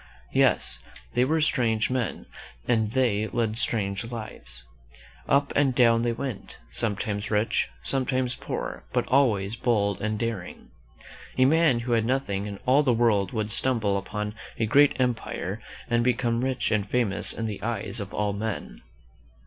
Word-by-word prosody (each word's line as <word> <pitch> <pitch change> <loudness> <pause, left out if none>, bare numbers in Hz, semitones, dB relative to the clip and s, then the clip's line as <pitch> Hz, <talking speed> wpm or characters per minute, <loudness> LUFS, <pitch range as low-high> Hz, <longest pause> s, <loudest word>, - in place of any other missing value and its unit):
Yes, - - +3 0.3
they 120 - +3
were 155 +5 +2
strange 120 -7 +2
men 125 -3 -2 0.4
and 110 -3 +2
they 115 -5 +2
led 110 0 -1
strange 100 -5 -1
lives. 110 - -8 0.7
Up 140 +1 +3
and 135 -3 +3
down 115 -2 +5
they 120 0 +1
went, 120 -2 -5
some 110 -3 +1
times 100 0 -3
rich, 105 +1 +1
sometimes 130 +1 +1
poor, - - -5
but - - +1
always 110 -6 +2
bold 105 -4 0
and 110 0 -1
daring, 110 -5 -5 0.7
A 130 - +5
man 155 -4 +4
who 120 +1 -4
had 115 -2 +3
nothing 115 -6 -1
in 100 -1 -6
all 135 +3 +5
the 140 -4 +2
world 110 -5 +2
would 110 -1 -2
stumble 115 -4 +1
upon 105 +2 -3 0.2
a 115 - +1
great 140 +6 +4
empire 125 -2 -2 0.3
and 120 0 +2
become 120 -1 +1
rich 130 -1 0
and 110 -2 +2
famous 105 -2 0
in 115 - -3
the 105 -3 -4
eyes 110 -1 -3
of 100 -2 -6
all 105 -1 -1
men. 100 - -4
115 Hz, 155 wpm, -26 LUFS, 105-125 Hz, 0.7 s, down